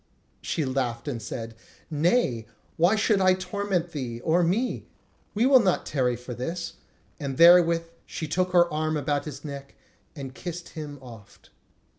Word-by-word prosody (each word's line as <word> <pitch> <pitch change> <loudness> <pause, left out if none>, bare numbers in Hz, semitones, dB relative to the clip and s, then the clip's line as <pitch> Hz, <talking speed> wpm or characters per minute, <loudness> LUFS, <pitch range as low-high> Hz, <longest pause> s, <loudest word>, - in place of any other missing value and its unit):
She 155 - -2
laughed 130 -2 -2
and 120 -6 -3
said: 115 +1 -6 0.4
"Nay, 150 - +1 0.3
why 175 +6 +4
should 215 -2 +2
I 185 0 +5
torment 185 -2 -2
thee...or 140 +4 -1
me? 200 +9 0 0.5
We 225 +4 +3
will 265 -1 +7
not 190 -6 +1
tarry 125 -4 0
for 125 +1 -8
this." 165 +9 -4 0.5
And 135 -3 -4
therewith 170 -1 +7 0.2
she 160 - -5
took 180 +4 0
her 175 -1 +5
arm 155 0 0
about 145 0 -1
his 145 -1 -8
neck 140 -1 -8 0.4
and 135 -3 -7
kissed 175 +3 -7
him 150 -2 -7
oft. 115 -5 -14
155 Hz, 150 wpm, -26 LUFS, 130-180 Hz, 0.5 s, will